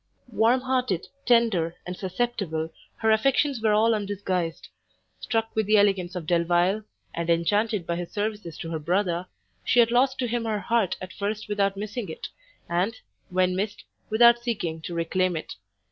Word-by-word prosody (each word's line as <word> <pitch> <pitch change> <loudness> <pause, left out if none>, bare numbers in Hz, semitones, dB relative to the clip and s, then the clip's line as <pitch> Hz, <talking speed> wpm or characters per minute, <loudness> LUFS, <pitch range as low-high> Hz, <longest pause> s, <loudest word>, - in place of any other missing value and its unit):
Warm 230 +4 +3
hearted, 255 -8 0 0.2
tender, 220 -9 +3
and 180 - -5
susceptible, 185 -5 -2 0.2
her 220 0 +1
affections 275 +3 +2
were 215 -1 +3
all 225 +2 +4
undisguised: 190 -5 -2 0.5
struck 225 -2 -2
with 220 -2 +1
the 215 0 +5
elegance 195 -3 +2
of 175 -3 -4
Delvile, 175 +4 +2 0.3
and 170 0 -3
enchanted 205 +4 +1
by 170 0 -2
his 175 -1 -5
services 205 -5 -3
to 165 - -6
her 160 - -2
brother, 175 +2 0 0.4
she 245 - +3
had 230 -1 +5
lost 260 +2 +3
to 255 -2 -1
him 235 0 -2
her 220 -1 0
heart 220 -2 +1
at 185 0 -8
first 210 +2 -3
without 200 -1 0
missing 210 0 -4
it, 160 - -6 0.4
and, 180 +6 0 0.3
when 180 0 +2
missed, 205 +2 -3 0.3
without 235 +2 +6
seeking 205 -9 -3
to 170 +1 -6
reclaim 175 +1 0
it. 155 - -6
205 Hz, 165 wpm, -26 LUFS, 175-225 Hz, 0.5 s, without